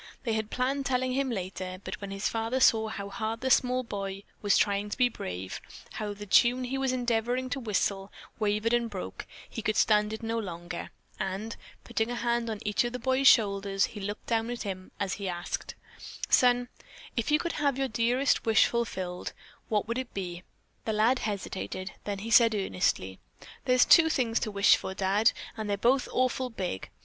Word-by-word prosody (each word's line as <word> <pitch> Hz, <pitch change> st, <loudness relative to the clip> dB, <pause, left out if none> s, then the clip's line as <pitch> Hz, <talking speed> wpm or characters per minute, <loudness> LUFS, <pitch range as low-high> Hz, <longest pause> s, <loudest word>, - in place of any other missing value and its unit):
They 230 Hz, -4 st, 0 dB
had 220 Hz, -1 st, -1 dB
planned 270 Hz, +2 st, -1 dB
telling 255 Hz, -1 st, +1 dB
him 270 Hz, +1 st, 0 dB
later, 185 Hz, -3 st, -4 dB
but -, -, -6 dB
when 200 Hz, -, -5 dB
his 195 Hz, 0 st, -2 dB
father 225 Hz, +3 st, -1 dB
saw 220 Hz, -3 st, +5 dB
how 200 Hz, -2 st, -5 dB
hard 220 Hz, +2 st, -3 dB
the 260 Hz, 0 st, 0 dB
small 255 Hz, 0 st, +3 dB
boy 195 Hz, -3 st, -5 dB, 0.2 s
was 205 Hz, -2 st, +3 dB
trying 205 Hz, 0 st, +1 dB
to -, -, -4 dB
be 250 Hz, -1 st, +4 dB
brave; 95 Hz, -, -6 dB, 0.3 s
how 210 Hz, -1 st, -4 dB
the 205 Hz, +1 st, -8 dB
tune 240 Hz, +5 st, +4 dB
he 255 Hz, +2 st, -2 dB
was 265 Hz, -1 st, +1 dB
endeavoring 245 Hz, +1 st, 0 dB
to 275 Hz, -, -1 dB
whistle 200 Hz, -3 st, -1 dB, 0.3 s
wavered 210 Hz, +2 st, +1 dB
and 240 Hz, -1 st, +2 dB
broke, 195 Hz, -4 st, -6 dB, 0.2 s
he 225 Hz, -, -6 dB
could 215 Hz, 0 st, 0 dB
stand 210 Hz, -1 st, +3 dB
it 220 Hz, +1 st, -6 dB
no 225 Hz, +1 st, -1 dB
longer, 175 Hz, -3 st, -6 dB, 0.3 s
and, 195 Hz, +3 st, -3 dB, 0.3 s
putting 225 Hz, -1 st, -1 dB
a 245 Hz, -, -2 dB
hand 235 Hz, -1 st, 0 dB
on 215 Hz, -2 st, -4 dB
each 210 Hz, +2 st, +2 dB
of 240 Hz, 0 st, -3 dB
the -, -, -2 dB
boy's 260 Hz, +2 st, +2 dB
shoulders, 200 Hz, -3 st, +4 dB
he 210 Hz, -, -7 dB
looked 205 Hz, +1 st, -5 dB
down 225 Hz, 0 st, 0 dB
at 245 Hz, 0 st, -4 dB
him 185 Hz, -2 st, -5 dB
as 195 Hz, -2 st, -1 dB
he 195 Hz, -, -2 dB
asked: 175 Hz, 0 st, -4 dB, 0.5 s
"Son, 245 Hz, -1 st, +4 dB, 0.5 s
if 235 Hz, -, -1 dB
you 300 Hz, -, +5 dB
could 340 Hz, +1 st, -2 dB
have 280 Hz, -3 st, +2 dB
your 270 Hz, 0 st, 0 dB
dearest 245 Hz, +4 st, +1 dB
wish 225 Hz, -1 st, +5 dB
fulfilled, 190 Hz, -7 st, -3 dB, 0.4 s
what 210 Hz, -1 st, +1 dB
would 235 Hz, +2 st, -1 dB
it 260 Hz, -2 st, -7 dB
be?" 175 Hz, -3 st, -4 dB, 0.4 s
The 220 Hz, -, 0 dB
lad 225 Hz, +5 st, +3 dB
hesitated, 195 Hz, -2 st, -4 dB
then 205 Hz, -1 st, -2 dB
he 220 Hz, +4 st, -6 dB
said 230 Hz, -1 st, +6 dB
earnestly: 180 Hz, -, -1 dB, 0.5 s
"There's 250 Hz, 0 st, +5 dB
two 325 Hz, -2 st, +7 dB
things 240 Hz, -6 st, +1 dB
to 220 Hz, -, -2 dB
wish 200 Hz, 0 st, +5 dB
for, 190 Hz, -, -6 dB
Dad, 195 Hz, +3 st, +3 dB, 0.2 s
and 215 Hz, -2 st, -4 dB
they're 200 Hz, -, +1 dB
both 245 Hz, +5 st, +2 dB
awful 255 Hz, 0 st, +1 dB
big. 185 Hz, -, -4 dB
220 Hz, 195 wpm, -29 LUFS, 200-245 Hz, 0.5 s, two